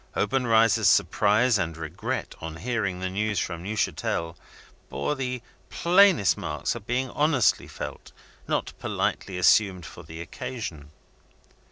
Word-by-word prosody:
Obenreizer's 115 -5 +3
surprise 105 - +3
and 85 -4 -2
regret, 80 +1 -4
on 80 0 -6
hearing 100 -2 -2
the 95 - -2
news 105 +1 -1
from 85 -2 -2
Neuchatel, 90 -4 -2 0.5
bore 70 - -2
the 125 -3 -4 0.3
plainest 180 - +4
marks - - -2
of 100 - -9
being 125 +1 -1
honestly 145 -6 +2
felt - - -8 0.4
not - - -1
politely 95 -2 -2
assumed 90 -1 +3
for - - -10
the 80 0 -10
occasion. 85 - -6
105 Hz, 125 wpm, -26 LUFS, 85-125 Hz, 0.5 s, plainest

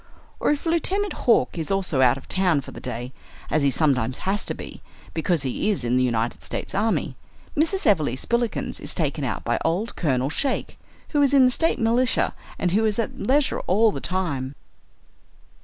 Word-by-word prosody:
Or - - +1
if 295 +2 0
Lieutenant 370 +5 +1
Hawk 230 -7 +2
is 160 - -3
also 190 -8 +1
out 125 0 +5
of 135 - -12
town 180 -6 +2
for - - -10
the - - -9
day, 125 +1 -5 0.4
as 155 - +2
he 140 - +3
sometimes 130 -3 +1
has 200 +3 +1
to - - -3
be, - - -9 0.3
because 165 -1 0
he 135 - -1
is 200 - 0
in 120 +1 +1
the 130 - +3
United 120 -1 -1
States - - -5
army, 215 +2 0 0.4
Mrs. 330 +4 +1
Everleigh 155 - +3
Spillikins 235 - -1
is - - -2
taken 150 -3 -1
out 120 -6 -2
by 120 - 0
old 185 +8 -1
Colonel 135 -4 0
Shake, 270 - -2 0.3
who 290 - +2
is 280 0 +4
in 265 -2 +7
the 255 - +4
State 325 +6 +2
militia 235 +2 +2 0.2
and 180 - 0
who 215 +5 +2
is 215 -2 +1
at 230 - -3
leisure 275 +7 +1
all 215 +4 +4
the - - -5
time. 145 -8 -2
185 Hz, 190 wpm, -24 LUFS, -, 0.4 s, in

